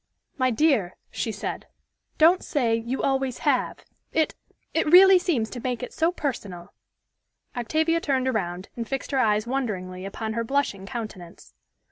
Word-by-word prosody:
"My 255 -2 +2
dear," 230 - +2 0.2
she 225 - -2
said, 210 - -5 0.5
"don't 335 +4 +5
say 245 -7 0
'you 235 +3 -3
always 270 -2 0
have;' 270 -4 0 0.3
it 315 -1 +1 0.4
it 320 - +1
really 380 +1 +9
seems 300 -12 0
to 250 - -6
make 250 -1 -3
it - - -6
so 325 +2 +2
personal." 205 - -5 0.8
Octavia 315 +7 +1
turned 265 -4 0
around, 185 -6 -2
and 230 -1 -4
fixed 270 +1 -3
her 270 - +1
eyes 215 -3 +2
wonderingly 195 -8 -3
upon 220 +3 -4
her 230 +1 -1
blushing 225 -7 -1
countenance. 215 -8 -8
250 Hz, 150 wpm, -25 LUFS, 215-285 Hz, 0.8 s, really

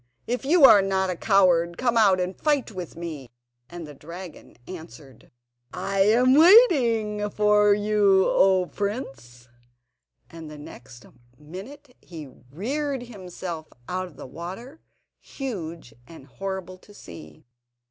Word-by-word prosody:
if 245 +2 -3
you 300 +2 +5
are 205 -6 +8
not 190 -1 -1
a - - -4
coward, 175 -3 +2
come 240 -2 0
out 200 -5 +4
and 180 +1 -3
fight 290 -6 0
with 180 -5 -8
me!" 155 -7 -8 0.4
And 175 -1 -9
the 150 - -11
dragon 170 +5 -12
answered: 160 -7 -12 0.5
"I 195 0 -3
am 235 +6 +4
waiting 250 - +4
for 210 0 +3
you, 205 -2 +2
O 190 -1 +3
prince," 135 - -6 0.8
and 165 -2 -11
the 150 - -11
next 125 -4 -13 0.3
minute 200 - -12
he 160 -4 -10 0.3
reared 270 - -3
himself 180 -7 -8 0.2
out 185 +1 -4
of 165 - -17
the - - -9
water, 185 - -9 0.4
huge 170 - -7
and 160 -5 -14
horrible 185 +3 -7
to 205 +2 -19
see. 80 - -13
190 Hz, 130 wpm, -24 LUFS, 165-225 Hz, 0.8 s, are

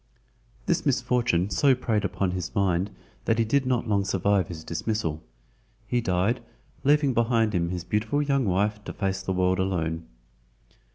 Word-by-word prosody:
This 175 -3 +1
misfortune 125 - +1
so 140 -2 +4
preyed 110 -4 0
upon 95 -2 -1
his 90 -2 -4
mind 95 -1 +1 0.4
that 115 - +2
he 115 - +2
did 135 +4 +1
not 125 -2 0
long 100 -2 +2
survive 95 -1 +1
his 80 -2 -7
dismissal—he 110 +6 -4
died, 95 +3 +1 0.4
leaving 145 -1 +3
behind 115 -2 +2
him 85 -2 0
his 90 -1 -3
beautiful 110 +10 0
young 140 -3 +1
wife 105 +2 0
to - - -5
face 95 -2 -2
the 95 - -3
world 95 0 +1
alone. 80 -3 -1
105 Hz, 155 wpm, -26 LUFS, 90-120 Hz, 0.4 s, so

